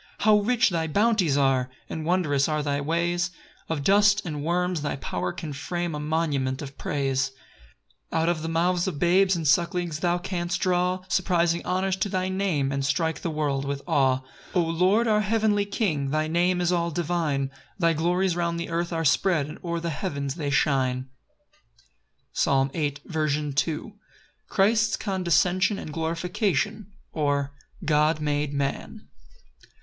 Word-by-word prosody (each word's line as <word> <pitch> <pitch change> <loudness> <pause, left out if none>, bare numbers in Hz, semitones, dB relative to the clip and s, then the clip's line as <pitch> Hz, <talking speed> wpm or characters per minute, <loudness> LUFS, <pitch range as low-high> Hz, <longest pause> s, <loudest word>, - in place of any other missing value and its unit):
6 - - -6
How 210 0 +6
rich 235 +1 +2
thy 165 -2 -1
bounties 200 -4 +2
are! 135 -2 +2 0.2
And 160 - -5
wondrous 155 -6 +2
are 150 -1 0
thy 145 -1 -1
ways: 170 +3 0 0.4
Of 155 -3 -2
dust 205 +3 +4
and 150 -4 -4
worms 180 0 0
thy 145 - -2
power 90 -9 -3
can 150 - -6
frame 175 +4 -3
A 150 - -3
monument 150 -4 -1
of 140 -1 -9
praise. 135 -2 -1 0.8
7 160 - +1
[Out - - 0
of 170 -2 0
the 165 - -3
mouths 175 +2 +1
of 175 -6 -3
babes 185 +3 +3
And 165 -3 -2
sucklings 170 +2 +1
thou 175 0 +1
canst 175 -1 -3
draw 180 0 +1
Surprising 175 -3 +1
honours 185 +1 0
to 195 +2 -1
thy 185 0 -1
name, 185 -8 0
And 140 0 -1
strike 160 +4 0
the 170 - -2
world 145 -3 -1
with 140 0 -4
awe.] 135 -5 +2 0.3
8 - - -16
O 180 - +4
Lord, 185 +8 +2
our 210 -1 +3
heavenly 210 -1 +1
King, 175 -9 -1
Thy 155 +2 0
name 175 +2 +1
is 175 0 +1
all 170 -1 +1
divine: 155 -5 -1 0.3
Thy 170 -3 +3
glories 175 +3 +1
round 170 -1 -1
the 170 - -4
earth 170 +1 -1
are 165 -1 -1
spread, 155 0 +3
And 150 - -9
o'er 170 -1 -2
the 170 0 -3
heavens 140 -5 -3
they 150 -3 -3
shine. 130 -2 +1 1.2
Psalm 135 0 +2
8:2. 150 -1 -1
C. 165 - +1
M. 215 - -10 0.6
Christ's 220 +2 +2
condescension 185 0 +1
and 155 - -7
glorification; 185 +5 -1 0.2
or, 145 -2 0 0.3
God 150 +1 +3
made 145 -1 -1
man. 140 -1 -3
165 Hz, 165 wpm, -25 LUFS, 145-185 Hz, 1.2 s, How